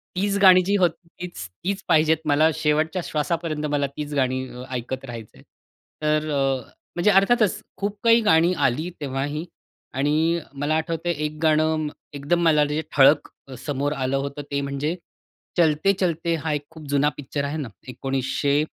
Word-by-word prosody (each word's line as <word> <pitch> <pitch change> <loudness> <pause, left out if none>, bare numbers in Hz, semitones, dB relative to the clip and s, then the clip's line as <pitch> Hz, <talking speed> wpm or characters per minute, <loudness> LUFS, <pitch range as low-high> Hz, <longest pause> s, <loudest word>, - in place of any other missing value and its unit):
तीच 200 +2 0
गाणी 185 -2 +8
जी 200 +2 +2
होती, 170 -2 0
तीच-तीच 175 - -5
पाहिजेत 160 0 +4
मला 155 +2 +4
शेवटच्या 155 +4 0
श्वासापर्यंत 155 0 -2
मला 145 -1 +1
तीच 150 0 -4
गाणी 130 -2 +1 0.3
ऐकत 130 +2 -4
राहायचं 115 - -9
आहे. - - -17 0.6
तर, 155 0 +1 0.7
म्हणजे 175 +4 +3
अर्थातच, 210 +1 +3 0.2
खूप 200 +1 -3
काही 230 0 +6
गाणी 170 -3 +4
आली 155 +8 -2
तेव्हाही 145 +3 -3 0.5
आणि 155 +5 +1
मला 145 +2 -1
आठवतंय 165 +1 -1
1 150 0 -5
गाणं 155 0 +2 0.3
एकदम 145 +5 0
मला 150 -2 +4
जे 150 +2 -1
ठळक 145 +2 +5 0.4
समोर 145 0 -1
आलं 135 0 -1
होतं 140 +1 -4
ते 140 0 0
म्हणजे, 140 +4 -2 0.6
चलते 165 +3 +3
चलते 170 -2 0
हा 160 - -1
एक 145 -1 -3
खूप 160 -2 -12
जुना 145 +1 +3
पिक्चर 140 0 -4
आहे 145 +2 -3
ना 140 -6 -4 0.2
1900 135 +3 0
150 Hz, 150 wpm, -23 LUFS, 140-170 Hz, 0.7 s, गाणी